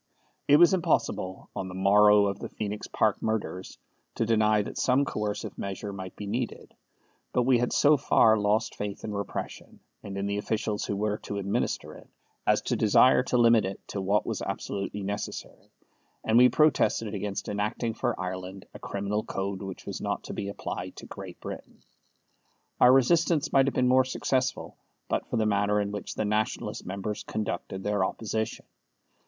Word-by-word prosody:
It 145 - +7
was 175 +4 +6
impossible, 160 - -1
on 95 - -3
the 90 - -8
morrow 105 +2 +5
of 100 -1 -2
the - - -6
Phoenix 105 -1 -5
Park 110 -2 +1
murders, 100 -5 -3 0.4
to 115 - 0
deny 110 -2 +3
that - - -6
some 130 +2 +3
coercive 105 -5 -3
measure 100 +1 -5
might 95 -1 -7
be 105 - -7
needed; 115 +4 -4 0.6
but 125 - +3
we 125 -1 +4
had 120 - 0
so 150 +1 +5
far 115 -5 +4
lost 105 +1 +1
faith 105 -1 -5
in 105 - -4
repression, 100 0 -6 0.2
and 100 -1 -7
in 100 - -2
the 100 0 -1
officials 105 0 -2
who 100 - -2
were 105 +1 -1
to 100 - -6
administer 100 0 -2
it, - - -15 0.4
as - - +3
to - - 0
desire 125 +4 +5
to 125 -1 0
limit 115 -2 +5
it 95 +1 -4
to 100 - -3
what 100 +2 +1
was - - -3
absolutely 100 0 -4
necessary, 100 +1 -6 0.5
and 110 - +1
we 125 +1 +8
protested 115 -8 +2
against 100 -1 -4
enacting 105 +3 -2
for 120 +1 -2
Ireland 95 +1 -5
a - - -10
criminal 100 +2 -2
code 95 -2 -4
which 95 -2 -7
was - - -5
not - - -2
to - - -7
be 100 - -4
applied 100 - -5
to - - -10
Great - - -9
Britain. - - -9 1.0
Our 125 - +7
resistance 155 +4 +3
might 135 0 +5
have 135 - -1
been 125 - +3
more 130 +1 +5
successful 130 0 -1 0.3
but - - -1
for - - -2
the 110 - +2
manner 105 0 +2
in 100 0 -1
which 105 -1 -6
the 110 - -1
Nationalist 105 +1 -2
members 100 +3 -4
conducted 95 -2 -4
their 105 -1 +1
opposition. 110 +2 -3
105 Hz, 180 wpm, -28 LUFS, 100-120 Hz, 1.0 s, we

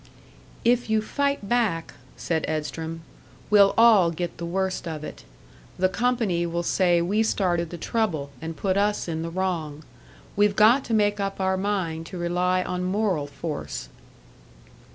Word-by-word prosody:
"If 240 -1 +2
you 220 0 +3
fight 280 0 -1
back," 215 -8 0 0.2
said 160 -2 -1
Edstrom, 160 +1 -4 0.5
"we'll 200 -1 +6
all 220 -7 +6
get 170 0 -5
the 170 - -4
worst 190 0 -2
of 155 -2 -5
it. - - -9 0.5
The 185 0 +2
company 225 -7 0
will 170 +1 -2
say 175 -1 +2
we 205 +5 +1
started 175 -6 0
the 175 - -7
trouble, 165 -9 -1
and 165 0 -6
put 190 -1 0
us 205 -1 +1
in 160 -1 -3
the 165 - -3
wrong. 165 -4 -3 0.5
We've 205 0 +3
got 230 +6 +5
to 225 - 0
make 205 -1 +2
up 195 0 -3
our 190 0 +1
mind 185 -5 -2
to 185 - -7
rely 180 +1 +1
on 180 0 -3
moral 185 -5 0
force." 150 +2 -6
185 Hz, 155 wpm, -25 LUFS, 165-210 Hz, 0.5 s, we'll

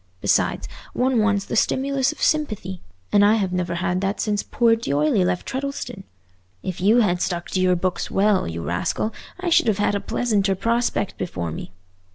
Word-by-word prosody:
Besides, - - +1 0.3
one 255 -1 +2
wants 210 -2 +2
the - - -4
stimulus 270 +3 +1
of 310 - -7
sympathy, 215 - 0 0.3
and 205 - +5
I 210 +2 +5
have 195 -4 -1
never 180 -1 -1
had 180 +1 -1
that 195 +2 -1
since 210 -2 0
poor 230 -2 +2
D'Oyley 155 -3 +1
left 180 0 -1
Treddleston. 265 -6 -4 0.6
If 185 -2 -4
you 220 +6 +5
had 180 -5 +1
stuck 175 -2 -2
to 185 - 0
your 185 0 +3
books 180 +1 -2
well, 200 0 +2
you 85 0 -5
rascal, 90 - -1 0.3
I 365 -1 -1
should 325 - +4
have 215 -3 +2
had 205 0 +1
a 200 - 0
pleasanter 205 -4 0
prospect 230 0 -1
before 90 - -3
me. 80 - -7
200 Hz, 185 wpm, -23 LUFS, 180-230 Hz, 0.6 s, and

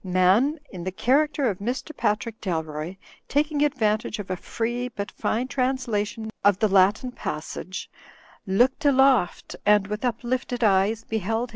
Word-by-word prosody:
Man 190 - +3
(in 180 -3 -7
the 185 - -3
character 280 +7 +2
of 195 -5 -2
Mr. 250 +8 -4
Patrick 220 +2 -1
Dalroy) 160 -1 -3 0.3
taking 295 +1 +1
advan 250 -8 +2
tage 220 - -6
of 200 -3 -6
a - - 0
free 240 +6 -3
but 205 -5 -6
fine 240 +4 -1
translation 245 -5 -1
of 200 -2 +5
the 215 - +2
Latin 200 +5 +3
passage, 180 -1 -5 0.6
"looked 245 +10 +2
aloft, 265 -8 +3
and 210 -1 +4
with 210 +3 -5
uplifted 245 0 -2
eyes 205 +2 +3
beheld. 225 +2 -2
220 Hz, 145 wpm, -25 LUFS, 195-255 Hz, 0.6 s, of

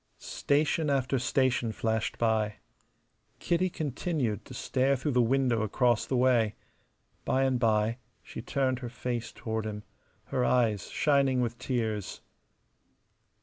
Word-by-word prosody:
Station 150 +2 0
after 135 -1 +1
station 130 -2 +1
flashed 110 0 -2
by. 110 -2 +1 0.8
Kitty 175 +2 0
continued 145 - -2
stare 135 +3 +1
through 135 +3 -2
the 125 -1 +3
window 125 -1 +2
across 120 +2 +1
the 130 - 0
way, 120 -4 +3 0.7
by 135 - +1
and 130 -2 +1
by 110 0 +1 0.2
she - - -8
turned 130 -2 0
her 125 -2 -6
face 120 -1 -4
toward 110 -1 -4
him, 105 -1 -5 0.5
her 125 - +2
eyes 115 -6 +1
shining 135 -2 +2
with 120 -1 -2
tears. 110 -6 -2
125 Hz, 125 wpm, -29 LUFS, 110-135 Hz, 0.8 s, the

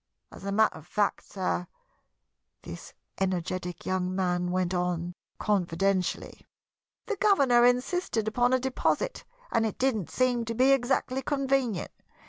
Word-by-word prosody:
As - - -12
a 200 - -2
matter 220 -1 +3
of 160 - -17
fact, 205 +2 -1
sir," 180 -2 -2 1.0
this - - -9 0.2
energetic 180 -1 -2
young 185 0 -1
man 180 -1 0
went 185 0 0
on, 175 -1 -1 0.2
confidentially, 195 -1 -1 0.6
"the 425 - -3
governor 275 - +4
insisted 245 -2 0
upon 245 +3 +2
a 260 - +4
deposit 265 - -1 0.3
and 225 - +2
it 220 - -2
didn't 240 -9 0
seem 250 -2 +1
to 230 0 -4
be 260 +3 +4
exactly 265 0 +1
convenient. 270 -6 0
215 Hz, 130 wpm, -28 LUFS, 180-255 Hz, 1.0 s, governor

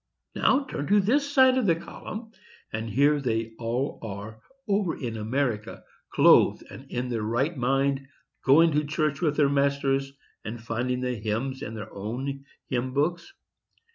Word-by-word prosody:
Now, 270 +2 +3
turn 145 - -5
to 205 +2 +5
this 280 +8 +1
side 260 -2 +5
of 235 - 0
the 165 - +4
column, 220 +6 -8 0.4
and 110 +1 -3
here 140 +6 +3
they 115 -3 -1
all 120 +4 -2
are, 110 +1 -7 0.3
over 200 -4 0
in 120 -5 -4
America, 115 0 -2 0.3
clothed - - +5
and - - -11
in 125 +1 -3
their 115 -2 -2
right 120 +10 0
mind, 135 +1 0 0.4
going 160 +5 +6
to 150 0 +1
church 150 -1 -1
with 150 -4 +1
their 145 -2 +5
masters, 140 -1 +1 0.3
and 115 +2 -6
finding 120 +2 -2
the 125 0 -1
hymns 115 +4 -3
in 110 - -5
their 110 - -8
own 130 +7 -5 0.2
hymn 130 0 -2
books. 170 - 0
135 Hz, 160 wpm, -26 LUFS, 115-150 Hz, 0.4 s, going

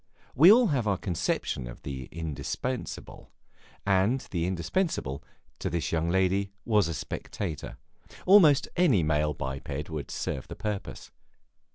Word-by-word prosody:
We 165 +8 +8
all 235 -1 +6
have 125 -7 0
our 100 -2 +2
conception 85 - -2
of - - -10
the 65 -2 -5
indispensable, 80 - -5 0.6
and 100 +6 +2
the 85 -2 0
indispensable, 85 - -1 0.4
to - - -2
this 85 -1 -2
young 80 0 0
lady, 95 +2 +2 0.2
was 105 -4 +3
a 85 - -3
spectator; 80 -1 -5 0.5
almost 175 -8 +6
any 140 - +4
male 75 -1 +1
biped 70 +3 -5
would 75 -4 -5
serve 65 - -4
the - - -7
purpose. 105 -2 -5
90 Hz, 135 wpm, -28 LUFS, 75-115 Hz, 0.6 s, We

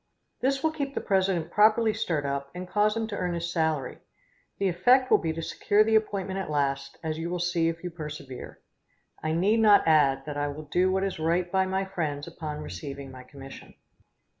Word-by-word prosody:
This 270 +1 0
will 320 - +2
keep 280 -3 -4
the - - 0
president 190 -4 0
properly 215 +1 +4
stirred 155 -8 -1
up, 140 0 -3
and 180 0 -6
cause 210 +3 +1
him 225 - -1
to 205 - -4
earn 180 -3 -2
his 170 +1 -3
salary. 160 -5 -1 0.6
The 195 - +1
effect 245 +9 +3
will - - +6
be 160 - -1
to 165 0 -5
secure 205 +5 +2
the 220 +1 0
appointment 200 -3 0
at 190 - -4
last, 140 -2 -1
as 160 0 -3
you 165 +1 -3
will 180 - -2
see 175 -1 +1
if 165 +1 -6
you 180 - -4
persevere. 150 -5 -8 0.6
I 155 - -1
need 195 +7 +2
not 210 -5 +5
add 140 -4 +4
that 150 -1 -5
I 145 0 0
will 145 +2 -6
do 180 +5 +2
what 190 0 +1
is 195 -4 -3
right 170 +2 0
by 190 0 +2
my 190 +1 -1
friends 155 -7 -3
upon 155 -3 -6
receiving 140 -2 -7
my 130 -1 -10
commission. 135 +1 -12
170 Hz, 210 wpm, -27 LUFS, 150-195 Hz, 0.6 s, will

